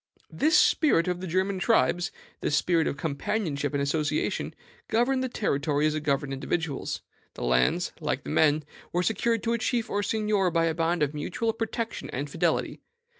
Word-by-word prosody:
"This 315 +4 +3
spirit 230 - +4
of 180 0 -1
the 185 - -4
German 185 +3 0
tribes 175 +1 +2 0.3
this 150 - 0
spirit 165 0 +2
of 140 - -2
companionship 155 -1 -2
and 140 - +1
association 150 +1 -1 0.3
governed 250 +3 +2
the 260 - -1
territory 150 - 0
as 155 - +2
it 155 - -2
governed 140 -1 0
individuals. 145 +1 -3 0.3
The - - -6
lands, 60 0 +2
like - - -2
the 75 - -5
men, 155 - +3 0.3
were 175 +1 +1
secured 230 +2 +1
to 230 - +1
a 235 - 0
chief 235 0 -1
or 205 - +1
seignior 210 -3 +1
by 165 -1 +2
a 165 - +1
bond 165 0 +1
of 145 0 0
mutual 225 +10 -2
protection 225 0 -4
and 140 +4 -3
fidelity. - - 0
170 Hz, 175 wpm, -27 LUFS, 145-220 Hz, 0.3 s, spirit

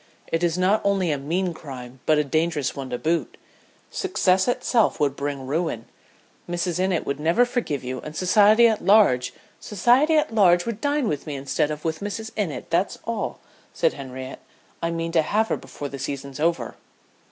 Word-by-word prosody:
"It 165 +1 0
is 170 0 +1
not 190 +4 +2
only 195 -4 +1
a 145 - 0
mean 175 +6 -1
crime, 130 -5 -9
but 155 - +4
a 150 - +3
dangerous 155 0 -1
one 135 -2 -6
to 125 - -2
boot. 165 +5 -1 0.5
Success 190 - +1
would 245 - +4
in - - -14
itself 230 -4 +1 0.2
bring 140 -2 -4
ruin. 150 -5 -2 0.6
Mrs. 175 0 -2
Innitt 185 -2 0
would 140 +1 -3
never 165 +11 +3
forgive 235 - -2
you, 130 0 -4
and 150 0 -9
society 210 +6 +5
at 220 -2 0
large 190 - +4 0.2
" - - -30
"Society 245 - +3
at 305 -6 +1
large 175 -5 +4
would 230 -2 -4
dine 285 -3 +1
with 150 -2 -3
me 150 - -4
instead 140 +2 -1
of 150 +1 -6
with 160 -1 -1
Mrs. 220 +2 -5
Innitt, 190 -9 -3
that's 175 +4 +1
all," 230 -1 -3 0.3
said 165 - +2
Henriette. 130 -1 -8 0.4
"I 165 - 0
mean 165 0 -3
to 165 -1 +4
have 215 +8 0
her - - +1
before 145 - -7
the 140 - -7
season's 140 0 -5
over." 170 +2 -1
170 Hz, 190 wpm, -24 LUFS, 145-205 Hz, 0.6 s, society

